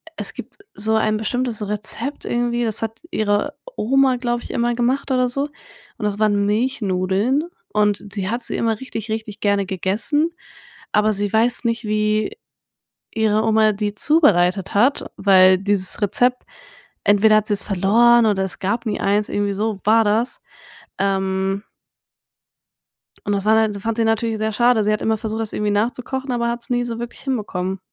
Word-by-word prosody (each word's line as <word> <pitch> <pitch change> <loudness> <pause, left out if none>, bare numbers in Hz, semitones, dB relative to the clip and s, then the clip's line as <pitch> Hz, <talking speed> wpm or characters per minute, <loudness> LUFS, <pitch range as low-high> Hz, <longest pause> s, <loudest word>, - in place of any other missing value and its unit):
Es 195 -4 -3
gibt 245 +7 -9 0.2
so 220 +2 0
ein 215 -1 +1
bestimmtes 220 -1 -2
Rezept 215 +6 -4
irgendwie, 240 0 -1
das 220 -1 -2
hat 225 0 -4
ihre 210 +5 0 0.2
Oma, 265 +2 +2
glaube 240 -1 -2
ich, - - -8
immer 240 0 0
gemacht 250 +4 0
oder 255 -1 +2
so 275 +3 -2 0.5
und 215 - -4
das 205 0 -2
waren 205 -2 +2
Milchnudeln 210 - 0 0.2
und 210 -1 +1
die 190 -2 -2
hat 235 +3 -2
sie - - -4
immer 225 -2 0
richtig, 225 -4 -7
richtig 220 -1 -5
gerne 200 -1 +1
gegessen, 210 - 0 0.6
aber 215 +1 +2
sie 205 0 -1
weiß 235 +3 +2
nicht, 230 0 -1
wie 215 - 0 0.8
ihre 220 -1 +1
Oma 220 -1 +3
die 205 0 -3
zubereitet 195 - +3
hat, 245 +8 +2
weil 185 -1 +5
dieses 195 -1 -1
Rezept 245 +5 +1 0.6
entweder 205 +1 +5
hat 215 0 +1
sie's 205 -2 0
verloren 230 +5 +4
oder 200 -3 +1
es 190 - -6
gab 225 +5 -2
nie 215 - -1
eins, 205 +1 +1
irgendwie 205 0 -1
so 210 0 -2
war 225 +2 +4
das. 220 +4 0 0.6
Ähm. 195 0 -1 1.6
Und 205 - 0
das 200 0 -1
war 220 +1 +4
da 205 -1 -6
fand 225 +2 -3
sie 230 - +2
natürlich 225 0 0
sehr 220 0 -1
schade. 235 0 +3
Sie 210 - +1
hat 215 - -1
immer 220 0 +1
versucht, 220 +1 -4
das 220 - -3
irgendwie 210 0 -1
nachzukochen, 250 +5 -2
aber 235 -1 0
hat's 235 0 -5
nie 245 -1 +1
so 235 -1 -5
wirklich 240 0 -7
hinbekommen. 195 -7 -3
215 Hz, 170 wpm, -20 LUFS, 205-240 Hz, 1.6 s, weil